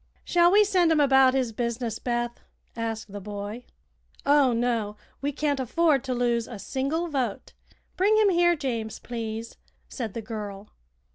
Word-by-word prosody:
"Shall 345 0 +4
we 415 +2 +6
send 365 -5 +3
him 315 - +3
about 265 -2 +5
his 255 -3 0
business, 235 0 -3
Beth?" 240 -1 -2 0.4
asked 225 -2 -4
the 205 0 -7
boy. 205 +4 -6 0.6
"Oh, 285 -2 +5
no; 230 -3 0 0.3
we 285 +1 -1
can't 290 -1 -1
afford 285 +2 +2
to 255 -1 -1
lose 235 -1 0
a 235 - -7
single 275 - -2
vote. 260 -9 -3 0.4
Bring 415 +4 +4
him 430 -2 +5
here, 345 0 +4
James, 230 -7 -3
please," 230 -1 -6 0.3
said 230 -6 -5
the 230 - -3
girl. 210 -2 -7
245 Hz, 155 wpm, -26 LUFS, 225-295 Hz, 0.6 s, we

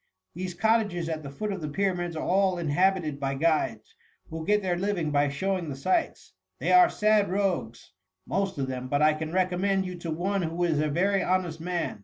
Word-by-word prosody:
These 180 +1 -5
cottages 205 -4 +1
at 160 -1 -3
the 140 - -8
foot 210 +10 -4
of 195 -3 -4
the 155 - -4
Pyramids 175 0 -1
are 155 - -3
all 190 0 +2
inhabited 170 -1 +1
by 135 -1 -2
guides, 135 -8 0 0.4
who 160 0 -5
get 210 0 +3
their 180 -2 0
living 175 -4 -1
by 145 0 +2
showing 180 +3 -2
the 140 - -4
sights. 160 +8 -1 0.2
They - - -1
are 360 -1 +7
sad 210 -1 +2
rogues, 180 - -2 0.3
most 195 -2 -1
of 135 - -1
them, 130 -1 -5
but 145 +3 +1
I 155 0 +5
can 155 +1 -5
recommend 190 +2 +1
you 185 - -5
to 170 - -6
one 190 +5 -1
who 170 +1 -2
is 160 -4 +1
a 155 0 +1
very 195 +6 +1
honest 180 -3 -1
man. 175 -9 -3
175 Hz, 205 wpm, -27 LUFS, 155-195 Hz, 0.4 s, are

